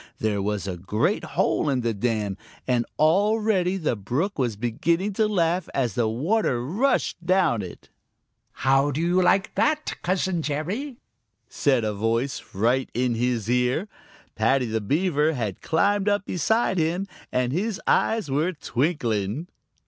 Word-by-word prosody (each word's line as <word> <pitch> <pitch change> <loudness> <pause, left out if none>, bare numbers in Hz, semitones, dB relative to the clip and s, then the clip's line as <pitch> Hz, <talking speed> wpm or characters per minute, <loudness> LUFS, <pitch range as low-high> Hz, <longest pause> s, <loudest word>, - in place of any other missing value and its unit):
There 105 -2 0
was 105 0 -2
a 95 -2 -4
great 95 +5 0
hole - - 0
in 130 -2 +1
the 115 -1 0
dam, 105 -2 -1 0.3
and 120 -2 +1
already 195 +2 +2
the 155 -9 0
brook 140 - -2
was 120 -5 0
beginning 165 - 0
to 215 +2 +2
laugh 180 -3 0
as 125 -6 0
the 115 +2 +1
water 125 - 0
rushed 200 - 0
down 175 - +2
it. 90 -3 -10 0.6
"How 135 +2 +2
do 145 +1 -2
you 175 +2 +2
like 190 +2 +2
that, 305 0 +1
Cousin 185 -1 0
Jerry?" 185 - -3 0.5
said 130 -5 +1
a 105 -1 -1
voice 115 +6 -1
right 120 +6 +1
in 125 0 +1
his 115 -2 -1
ear. 125 - +1 0.5
Paddy 125 +4 +2
the 110 -1 -2
Beaver 155 - +1
had 110 -8 -3
climbed 200 +5 +2
up 205 -1 0
beside 190 +2 +1
him, 170 +4 0 0.3
and 125 0 0
his 200 +4 -1
eyes 220 -4 +2
were 155 +7 +1
twinkling. 130 - -1
145 Hz, 150 wpm, -25 LUFS, 115-185 Hz, 0.6 s, already